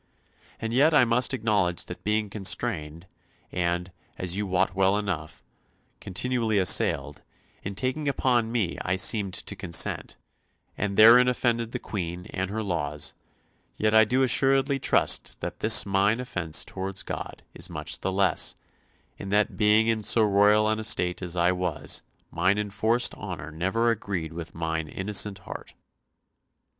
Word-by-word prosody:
And 115 0 -4
yet 150 +5 +4
I 125 - +6
must 120 +2 +1
acknowledge 105 -8 0
that 90 - -9
being 105 0 0
constrained, 95 -6 -2 0.5
and, 90 +1 -2 0.3
as 90 -1 -1
you 105 0 -2
wot 90 -1 +1
well 95 +1 +2
enough, 90 -7 -4 0.6
continually 115 +2 -1
assailed, 75 -6 +2 0.4
in 100 0 -6
taking 130 +7 -2
upon 120 -4 +1
me 105 -8 -1
I 95 - -1
seemed 95 0 +1
to - - -4
consent, 90 -4 0 0.6
and 100 -1 -3
therein 120 +3 +8
offended 120 -2 0
the - - -3
Queen 90 -3 -5
and 95 0 -3
her 110 +2 -3
laws, 75 -6 -2 0.6
yet 110 0 +1 0.2
do 130 +2 +2
I - - +4
assuredly 135 +2 +2
trust - - +1
that - - -6
this - - +5
mine 100 +3 +1
offence 90 -10 -2
towards 95 0 -5
God - - -7
is - - -5
much - - -4
the 95 - -2
less, 95 0 +1 0.6
in 100 - -7
that 105 +1 +1
being 105 +1 +3
in 115 -1 0
so 110 +2 +2
royal 105 +1 +4
an 110 0 0
estate 90 -5 0
as 90 -2 -5
I 85 +1 +3
was, 90 -3 -2 0.3
mine 90 +4 +1
enforced 110 +3 +1
honour 75 +2 -7
never 95 +9 0
agreed 95 -8 -4
with 85 -1 -8
mine 80 -1 -3
innocent 100 +3 0
heart." - - -9
100 Hz, 150 wpm, -26 LUFS, 90-115 Hz, 0.6 s, therein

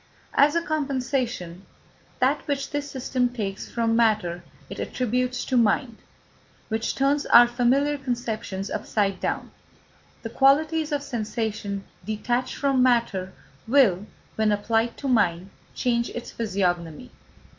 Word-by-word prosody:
As 290 +3 +4
a 335 - +1
compensation, 255 - -2 0.5
that - - +2
which 280 -1 -2
this 290 0 -3
system 255 -2 -1
takes 205 -5 -5
from 230 -1 0
matter 210 -7 +1 0.2
it - - -8
attributes 250 0 -1
to 260 - -1
mind, 230 +1 +2 0.7
which 220 0 -1
turns 280 +2 +1
our 240 0 +8
familiar 265 +4 +1
conceptions 225 -6 -4
upside 205 -2 -1
down. - - -3 0.7
The 225 - -5
qualities 305 +4 +3
of 290 -1 -1
sensation 215 -5 -3 0.2
detached 240 +4 -2
from 275 -2 +1
matter 235 -7 +2 0.4
will, 220 -7 +3 0.3
when 220 -1 +2
applied 225 +3 0
to 280 - -5
mind, 195 -7 +1 0.2
change 235 -1 0
its 240 - -7
physiognomy. 185 -3 -2
235 Hz, 125 wpm, -25 LUFS, 210-270 Hz, 0.7 s, our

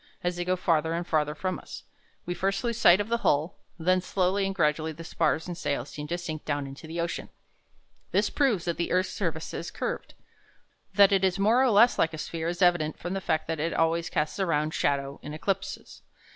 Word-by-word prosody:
As 180 0 0
they 175 - -2
go 185 +1 +1
farther 165 -3 +1
and 170 +1 -2
farther 150 -3 0
from 185 +3 -2
us, - - -10 0.4
we 175 - -2
first 195 +3 -1
lose 235 -1 -1
sight 175 +3 +7
of 205 - -1
the 235 +1 0
hull, 150 -4 +1 0.2
and 165 0 -9
then 185 0 +4
slowly 190 +1 +1
and 195 - -3
gradually 155 -1 +1
the 165 +2 -9
spars 160 -1 0
and 175 - -4
sails 140 -5 -2
seem 150 0 -7
to 175 - -2
sink 155 -3 -5
down 145 -1 -2
into 135 +3 -9
the 165 +2 -5
ocean. 170 0 -3 0.8
This - - +1
proves 235 - +1
that 170 -1 -1
the 170 - -2
earth's 185 +1 +1
surface 165 -5 -3
is 170 - -4
curved. - - -4 0.8
That 200 -1 +7
it 195 -1 +3
is 190 -1 +2
more 220 +6 +4
or 265 - +4
less 230 +3 +5
like 160 -1 +2
a - - -8
sphere 165 +1 -4
is 175 +2 0
evident 170 -4 +3
from 175 +2 -5
the 195 - -2
fact 160 -3 0
that 165 -1 -2
it 165 +3 -1
always 165 +1 +1
casts 150 +5 -1
a 190 - +2
round 155 -1 0
shadow 140 -1 -1
in 150 +1 -7
eclipses. 195 +4 -4
170 Hz, 225 wpm, -27 LUFS, 155-190 Hz, 0.8 s, sight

